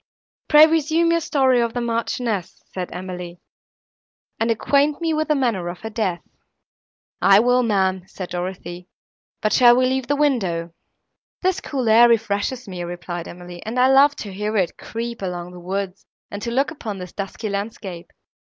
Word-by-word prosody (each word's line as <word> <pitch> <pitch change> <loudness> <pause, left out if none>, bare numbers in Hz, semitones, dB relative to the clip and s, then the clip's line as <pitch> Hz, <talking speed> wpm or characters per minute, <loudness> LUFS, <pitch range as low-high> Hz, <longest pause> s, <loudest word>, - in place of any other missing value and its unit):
"Pray 300 0 +8
resume 325 +1 +2
your 335 - +3
story 265 -5 +2
of 235 -1 -1
the - - 0
Marchioness," 230 -4 -2
said 180 -1 -4
Emily, 180 -1 -7 1.0
"and 225 - +1
acquaint 280 +6 +2
me 330 -2 0
with 310 0 0
the 300 - +2
manner 230 -10 0
of 175 0 -6
her 220 - -6
death." 200 -6 -2 1.0
"I 195 0 +7
will, 245 +2 +3
ma'am," 190 -5 0
said 185 -2 -8
Dorothée, 180 0 -5 0.6
"but 215 - +2
shall 240 -1 +7
we 255 +1 +3
leave 260 0 -1
the 290 - +1
window?" 190 - 0 0.7
"This 375 +1 +1
cool 260 -5 -3
air 230 +2 +7
refreshes 230 +3 0
me," 180 -2 -5
replied 175 0 -6
Emily, 175 0 -10
"and 225 +3 -3
I 255 +1 +5
love 280 +2 +6
to 200 -3 -7
hear 210 +2 -2
it 180 -4 0
creep 235 0 -6
along 180 -2 -4
the 180 - -11
woods, 190 +1 -4 0.2
and 205 - -6
to 235 - -3
look 265 +4 +1
upon 220 -10 -6
this 180 -1 -8
dusky 205 +2 -5
landscape. 200 -3 -5
220 Hz, 170 wpm, -22 LUFS, 180-255 Hz, 1.0 s, Pray